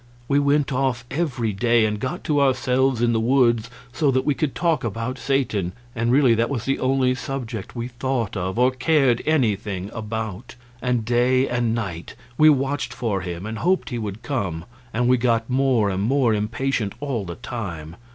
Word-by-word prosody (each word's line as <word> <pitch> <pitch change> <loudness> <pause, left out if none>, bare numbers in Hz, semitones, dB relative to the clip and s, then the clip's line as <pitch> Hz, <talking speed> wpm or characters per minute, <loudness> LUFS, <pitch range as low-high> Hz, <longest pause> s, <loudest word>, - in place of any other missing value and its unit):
We 140 +1 +3
went 145 -1 +2
off 130 -3 0
every 130 -8 -1
day 115 +2 +3
and 105 -1 -1
got 130 - -4
to 145 -2 +1
ourselves 130 -2 +2
in 120 0 +3
the 110 - +2
woods 120 -2 +2 0.2
so 145 +3 +1
that 130 0 +1
we 145 - +3
could 140 0 -2
talk 165 -3 +1
about 115 +4 -3
Satan, 110 -10 0 0.2
and 115 +1 0
really 130 -2 +5
that 115 +1 +1
was 130 -5 -3
the 135 - 0
only 130 -1 +2
subject 125 -5 -5
we 120 0 -3
thought 125 -3 -2
of 95 +1 -3
or 125 +1 +4
cared 130 -3 +2
anything 105 -9 0
about; 110 0 -5 0.3
and 125 -3 0
day 125 +3 +3
and 120 -2 0
night 90 -7 -5 0.2
we 155 +4 +6
watched 140 0 0
for 105 -6 -1
him 90 +1 -5
and 110 0 -5
hoped 185 -2 +1
he 120 - -2
would 105 +1 -5
come, 100 - -3 0.3
and 120 +2 0
we 125 0 +4
got 115 -2 +1
more 125 -6 +2
and 95 0 -2
more 120 +1 +2
impatient 110 0 -1
all 135 -7 -2
the 85 -2 -6
time. 85 -9 -6
120 Hz, 185 wpm, -23 LUFS, 110-135 Hz, 0.3 s, we